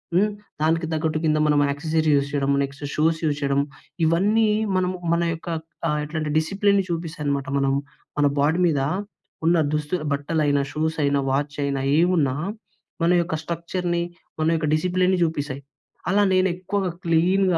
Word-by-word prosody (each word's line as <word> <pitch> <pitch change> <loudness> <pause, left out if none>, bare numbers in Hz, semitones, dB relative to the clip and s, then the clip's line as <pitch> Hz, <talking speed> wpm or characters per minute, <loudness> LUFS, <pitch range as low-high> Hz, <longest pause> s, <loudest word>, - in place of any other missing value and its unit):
హ్మ్. 210 +3 +3 0.3
దానికి 165 +2 +2
తగ్గట్టు 155 0 0
కింద 155 -1 +3
మనం 150 -1 +3
యాక్సెసిరీస్ 155 +2 0
యూస్ 140 0 +1
చేయడం. 140 -1 0
నెక్స్ట్ 140 +1 -7
షూస్ 160 +1 +2
యూస్ 145 -2 +1
చేయడం. 140 0 +2 0.4
ఇవన్నీ 205 +7 +3 0.3
మనం 185 0 +1 0.2
మన 170 0 +2
యొక్క 165 +2 -10 0.4
ఎ - - +2
ఎట్లాంటే 155 0 -3
డిసిప్లైన్ 200 +4 +2
చూపిస్తాయి 165 -3 -4
అనమాట. 140 -1 -1
మనం 135 -1 +2 0.5
మన 145 - +4
బాడీ 155 +5 +2
మీద 145 -5 +1 0.6
ఉన్న 170 +1 +4 0.2
దుస్తులు 150 +2 -1
బట్టలైనా 145 0 +1
షూస్ 160 +1 -1
అయినా 140 0 +2
వాచ్ 145 +2 -1
అయినా 140 -1 -1 0.2
ఏమున్నా 165 -7 +2 0.7
మన 170 - +4
యొక్క 170 -1 -2
స్ట్రక్చర్‌ని 170 +1 -2 0.4
మన 155 - +2
యొక్క 155 -1 -1
డిసిప్లైన్‌ని 185 +3 +1
చూపిస్తాయి. 145 -4 -2 0.5
అలా 205 +1 +4
నేను 185 0 +4
ఎక్కువగా 185 +1 -2
క్లీన్‍గా 180 +2 +3
160 Hz, 150 wpm, -23 LUFS, 145-180 Hz, 0.7 s, మన